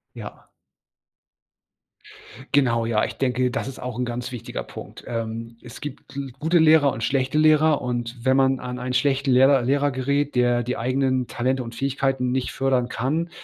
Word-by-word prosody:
Ja. -, -, -10 dB, 2.1 s
Genau, 120 Hz, -5 st, +3 dB
ja. 110 Hz, -2 st, +1 dB
Ich -, -, -8 dB
denke, 125 Hz, -1 st, 0 dB
das 130 Hz, -, -3 dB
ist 135 Hz, -2 st, -7 dB
auch 125 Hz, -1 st, -6 dB
'n 125 Hz, -, 0 dB
ganz 120 Hz, +1 st, -4 dB
wichtiger 120 Hz, -3 st, -6 dB
Punkt. -, -, -11 dB
Ähm, 115 Hz, 0 st, -5 dB
es 120 Hz, -2 st, -11 dB
gibt 145 Hz, -1 st, -9 dB
L 135 Hz, -1 st, -5 dB
gute 160 Hz, +4 st, +2 dB
Lehrer 155 Hz, -4 st, +5 dB
und 115 Hz, -, -7 dB
schlechte 135 Hz, +2 st, 0 dB
Lehrer 155 Hz, -1 st, +4 dB
und 120 Hz, -1 st, -3 dB
wenn 130 Hz, -, +4 dB
man 135 Hz, -1 st, +2 dB
an 125 Hz, 0 st, -5 dB
einen 125 Hz, +1 st, -4 dB
schlechten 135 Hz, +1 st, +1 dB
Lehrer 135 Hz, +1 st, +5 dB
Lehrer 140 Hz, +3 st, +1 dB
gerät, 140 Hz, +2 st, -1 dB
der 120 Hz, -1 st, +2 dB
die 125 Hz, +2 st, -3 dB
eigenen 130 Hz, +1 st, 0 dB
Talente 130 Hz, +2 st, -1 dB
und 115 Hz, -1 st, -8 dB
Fähigkeiten 135 Hz, 0 st, -1 dB
nicht 130 Hz, 0 st, -1 dB
fördern 130 Hz, -2 st, 0 dB
kann, 155 Hz, +8 st, -1 dB
130 Hz, 175 wpm, -23 LUFS, 125-140 Hz, 2.1 s, Lehrer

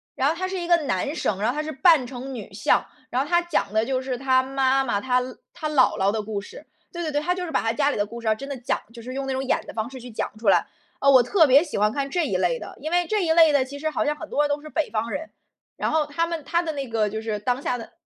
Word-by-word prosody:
然 270 Hz, -, +2 dB
后 320 Hz, -, 0 dB
他 370 Hz, +2 st, -2 dB
是 375 Hz, 0 st, -3 dB
一 345 Hz, -, -4 dB
个 345 Hz, -, +5 dB
男 275 Hz, -, -1 dB
生， 200 Hz, -, -1 dB
然 220 Hz, -, +2 dB
后 250 Hz, -, -1 dB
他 305 Hz, -, -1 dB
是 310 Hz, -, -4 dB
扮 300 Hz, -1 st, +4 dB
成 255 Hz, +1 st, -7 dB
女 205 Hz, -4 st, -8 dB
相， 205 Hz, -, +2 dB, 0.2 s
然 250 Hz, -, -1 dB
后 -, -, -8 dB
他 345 Hz, +1 st, +3 dB
讲 335 Hz, -, -1 dB
的 220 Hz, 0 st, +3 dB
就 260 Hz, +2 st, -1 dB
是 260 Hz, -1 st, -3 dB
他 260 Hz, 0 st, +2 dB
妈 270 Hz, 0 st, +2 dB
妈、 220 Hz, -6 st, -1 dB
他 250 Hz, +1 st, +2 dB, 0.3 s
他 315 Hz, -3 st, -4 dB
姥 285 Hz, -4 st, +3 dB
姥 195 Hz, +1 st, +3 dB
的 215 Hz, 0 st, -2 dB
故 210 Hz, -1 st, -4 dB
事。 470 Hz, -, -12 dB, 0.3 s
对 345 Hz, -, -4 dB
对 320 Hz, -2 st, -2 dB
对， 290 Hz, -, +1 dB
他 345 Hz, +4 st, 0 dB
就 360 Hz, 0 st, -4 dB
是 325 Hz, -, -6 dB
把 -, -, +1 dB
他 225 Hz, 0 st, 0 dB
家 285 Hz, +4 st, +2 dB
里 -, -, -2 dB
的 205 Hz, -, +1 dB
故 235 Hz, +3 st, -9 dB
事， 230 Hz, -, -5 dB
哦， 215 Hz, -, +3 dB
真 275 Hz, +5 st, -8 dB
的 280 Hz, -, -4 dB
讲 245 Hz, -, -1 dB
就 235 Hz, -, -10 dB
是 255 Hz, +3 st, -7 dB
用 275 Hz, 0 st, -3 dB
那 270 Hz, -, -2 dB
种 260 Hz, +1 st, -2 dB
演 265 Hz, -, +1 dB
的 -, -, -9 dB
方 220 Hz, +1 st, -3 dB
式 260 Hz, -1 st, -9 dB
去 245 Hz, 0 st, -10 dB
讲 220 Hz, -, -3 dB
出 215 Hz, -2 st, +1 dB
来。 -, -, +4 dB, 0.3 s
呃， 275 Hz, -, +4 dB
我 260 Hz, -3 st, +7 dB
特 325 Hz, -, +4 dB
别 280 Hz, +4 st, +6 dB
喜 310 Hz, -, -4 dB
欢 210 Hz, +1 st, +3 dB
看 275 Hz, +3 st, -2 dB
这 340 Hz, -2 st, +1 dB
一 190 Hz, -, 0 dB
类 175 Hz, -3 st, +1 dB
的， -, -, -9 dB
因 310 Hz, +4 st, -5 dB
为 350 Hz, -1 st, +2 dB
这 420 Hz, -2 st, +1 dB
一 320 Hz, -, +2 dB
类 325 Hz, -1 st, +6 dB
的 280 Hz, -3 st, +3 dB
其 280 Hz, +2 st, -9 dB
实 310 Hz, +2 st, -1 dB
好 310 Hz, -, -1 dB
像 300 Hz, 0 st, +1 dB
很 310 Hz, +1 st, -9 dB
多 295 Hz, -, +2 dB
人 290 Hz, -, 0 dB
都 290 Hz, 0 st, -1 dB
是 305 Hz, -, -10 dB
北 315 Hz, 0 st, -1 dB
方 225 Hz, +1 st, -2 dB
人， 320 Hz, +2 st, -4 dB, 0.5 s
然 -, -, -1 dB
后 315 Hz, -1 st, +2 dB
他 300 Hz, +3 st, 0 dB
们 335 Hz, -2 st, -4 dB
他 340 Hz, +5 st, +1 dB
的 320 Hz, -, -2 dB
那 280 Hz, -3 st, -4 dB
个 225 Hz, -2 st, +1 dB
就 220 Hz, +1 st, -4 dB
是 220 Hz, -1 st, -2 dB
当 245 Hz, +5 st, -1 dB
下 250 Hz, -, -1 dB
的 230 Hz, -, -10 dB
270 Hz, 350 characters per minute, -24 LUFS, 230-310 Hz, 0.5 s, 我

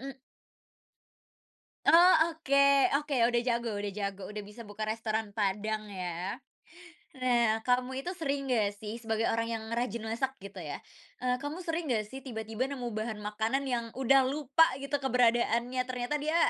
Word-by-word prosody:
Mmm 270 Hz, +1 st, -7 dB, 1.7 s
Oh, 350 Hz, +2 st, +8 dB, 0.2 s
oke 300 Hz, -4 st, -1 dB, 0.4 s
oke, 295 Hz, +1 st, -4 dB, 0.2 s
udah 240 Hz, -1 st, +2 dB
jago 235 Hz, -1 st, 0 dB
udah 205 Hz, 0 st, -3 dB
jago, 200 Hz, -1 st, -4 dB
udah 210 Hz, -, -4 dB
bisa 210 Hz, +3 st, -10 dB
buka 215 Hz, +1 st, -5 dB
restoran 220 Hz, -1 st, -2 dB
padang, 215 Hz, +1 st, -1 dB
ya. 180 Hz, -1 st, -4 dB, 0.8 s
Nah, 235 Hz, -4 st, +2 dB
kamu 255 Hz, +2 st, 0 dB
itu 355 Hz, -, -3 dB
sering 280 Hz, -6 st, -2 dB
nggak 210 Hz, -4 st, +1 dB
sih 215 Hz, +3 st, -7 dB
sebagai 225 Hz, -1 st, -1 dB
orang 230 Hz, 0 st, 0 dB
yang 220 Hz, -, -5 dB
rajin 235 Hz, -1 st, -2 dB
masak, 235 Hz, +4 st, -2 dB
gitu 200 Hz, -1 st, -8 dB
ya, 150 Hz, -4 st, -6 dB, 0.4 s
eee, 250 Hz, 0 st, +1 dB
kamu 290 Hz, +3 st, -5 dB
sering 335 Hz, 0 st, -2 dB
nggak 230 Hz, -5 st, +1 dB
sih 265 Hz, -, -6 dB
tiba-tiba 225 Hz, -1 st, -4 dB
nemu 255 Hz, -4 st, -4 dB
bahan 215 Hz, 0 st, -3 dB
makanan 220 Hz, +6 st, -1 dB
yang 245 Hz, -3 st, -1 dB
udah 265 Hz, 0 st, +4 dB
lupa 290 Hz, +3 st, +3 dB, 0.2 s
gitu 280 Hz, +1 st, -1 dB
keberadaannya, 245 Hz, -1 st, +2 dB
ternyata 250 Hz, +2 st, -2 dB
dia 310 Hz, +3 st, -1 dB
235 Hz, 155 wpm, -30 LUFS, 215-265 Hz, 1.7 s, Oh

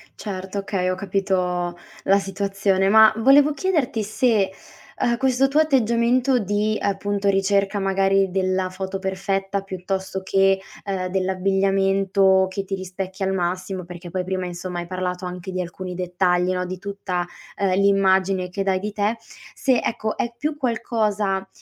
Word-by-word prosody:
Certo, 195 Hz, -1 st, -5 dB
okay, 190 Hz, -2 st, -1 dB
ho 185 Hz, -, 0 dB
capito 185 Hz, -2 st, -1 dB, 0.3 s
la 195 Hz, +1 st, +4 dB
situazione. 195 Hz, 0 st, 0 dB
Ma 220 Hz, +1 st, +8 dB
volevo 280 Hz, +5 st, +5 dB
chiederti 285 Hz, -, 0 dB
se, 215 Hz, -2 st, +1 dB, 0.5 s
uhm, 235 Hz, -1 st, +2 dB
questo 265 Hz, +1 st, +2 dB
tuo 295 Hz, +3 st, +3 dB
atteggiamento 250 Hz, -2 st, +2 dB
di, 210 Hz, +1 st, 0 dB
appunto, 200 Hz, 0 st, 0 dB
ricerca 195 Hz, +1 st, +1 dB
magari 195 Hz, 0 st, +2 dB
della 185 Hz, 0 st, 0 dB
foto 190 Hz, +1 st, -5 dB
perfetta, 195 Hz, +1 st, -2 dB
piuttosto 190 Hz, 0 st, -4 dB
che, 195 Hz, 0 st, +3 dB, 0.3 s
ehm, 190 Hz, -2 st, -2 dB
dell'abbigliamento 195 Hz, 0 st, +2 dB
che 195 Hz, +1 st, -4 dB
ti 195 Hz, +1 st, -3 dB
rispecchia 190 Hz, +1 st, -5 dB
al 190 Hz, -, 0 dB
massimo, 185 Hz, 0 st, -2 dB
perché 175 Hz, 0 st, -9 dB
poi 185 Hz, -1 st, -2 dB
prima 185 Hz, 0 st, -2 dB
insomma, 175 Hz, 0 st, -5 dB
hai 175 Hz, -, -5 dB
parlato 185 Hz, 0 st, -3 dB
anche 180 Hz, +1 st, -6 dB
di 185 Hz, 0 st, -2 dB
alcuni 180 Hz, +1 st, -6 dB
dettagli 180 Hz, 0 st, +1 dB
no, 180 Hz, 0 st, -1 dB
di 185 Hz, +1 st, -5 dB
tutta, 195 Hz, -3 st, -3 dB, 0.3 s
ehm, 195 Hz, -2 st, +1 dB
l'immagine 190 Hz, -2 st, +3 dB
che 195 Hz, +2 st, -3 dB
dai 190 Hz, -1 st, +1 dB
di 210 Hz, +2 st, -4 dB
te; 210 Hz, +3 st, 0 dB, 0.4 s
se 255 Hz, -3 st, +2 dB
ecco, 220 Hz, -1 st, -2 dB
è 235 Hz, -, -2 dB
più 300 Hz, +3 st, -2 dB
qualcosa, 215 Hz, -6 st, -1 dB
195 Hz, 150 wpm, -22 LUFS, 185-205 Hz, 0.5 s, Ma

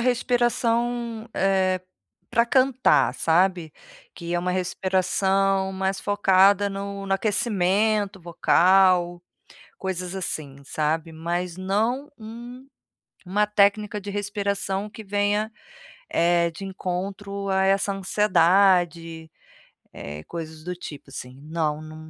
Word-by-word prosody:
respiração, 240 Hz, -1 st, 0 dB
eh, 190 Hz, -1 st, +1 dB, 0.5 s
pra 235 Hz, -, +3 dB
cantar, 260 Hz, +1 st, +3 dB
sabe, 175 Hz, -1 st, +1 dB, 0.4 s
que 170 Hz, 0 st, -5 dB
é -, -, +2 dB
uma 180 Hz, +1 st, -1 dB
respiração 190 Hz, +1 st, +1 dB
mais 190 Hz, 0 st, -2 dB
focada 200 Hz, 0 st, +4 dB
no 200 Hz, 0 st, -5 dB
no 195 Hz, -, -1 dB
aquecimento 205 Hz, -1 st, +1 dB
vocal, 175 Hz, +1 st, +3 dB, 0.6 s
coisas 185 Hz, -1 st, -4 dB
assim, 145 Hz, -7 st, -5 dB
sabe. 155 Hz, +3 st, -2 dB
Mas 170 Hz, +2 st, -3 dB
não 220 Hz, +9 st, -1 dB
um 240 Hz, +4 st, -10 dB, 0.6 s
uma 205 Hz, +4 st, +1 dB
técnica 210 Hz, 0 st, +2 dB
de 200 Hz, -, -7 dB
respiração 200 Hz, -1 st, -2 dB
que 220 Hz, +1 st, -10 dB
venha, 205 Hz, +2 st, 0 dB, 0.6 s
eh, 170 Hz, 0 st, +2 dB
de 170 Hz, +4 st, -9 dB
encontro 195 Hz, +1 st, -4 dB
a 190 Hz, 0 st, +2 dB
essa 195 Hz, +1 st, +2 dB
ansiedade, 175 Hz, -4 st, +2 dB, 0.6 s
eh, 75 Hz, +1 st, -8 dB
coisas 160 Hz, -2 st, -7 dB
do 180 Hz, +2 st, -4 dB
tipo 145 Hz, -5 st, -10 dB
assim. 125 Hz, 0 st, -9 dB
Não, 155 Hz, -1 st, -2 dB
nu 155 Hz, 0 st, -10 dB
190 Hz, 110 wpm, -24 LUFS, 175-205 Hz, 0.6 s, focada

